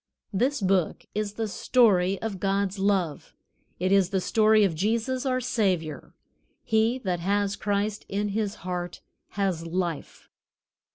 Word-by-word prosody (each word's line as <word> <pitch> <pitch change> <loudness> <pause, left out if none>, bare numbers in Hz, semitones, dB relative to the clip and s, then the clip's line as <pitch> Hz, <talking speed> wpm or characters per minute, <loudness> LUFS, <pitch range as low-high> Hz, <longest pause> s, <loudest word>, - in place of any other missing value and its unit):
This 255 +6 +1
Book 185 -3 +1
is 210 -1 -2
the 225 +1 -2
story 195 -4 +3
of 210 -4 -3
God's 195 0 0
love. 190 -7 0 0.4
It 185 +2 0
is 195 -2 +4
the 190 - 0
story 215 +2 +4
of 190 -4 +2
Jesus, 230 - -1
our 255 -1 +1
Savior. 190 - -1 0.5
He 225 +2 +2
that 180 -3 -1
has 200 +2 0
Christ 205 +1 -2
in 205 +1 -1
his 210 0 -2
heart 180 -1 -4 0.3
has 185 -5 -1
life. 170 -3 -4
200 Hz, 135 wpm, -26 LUFS, 185-220 Hz, 0.5 s, is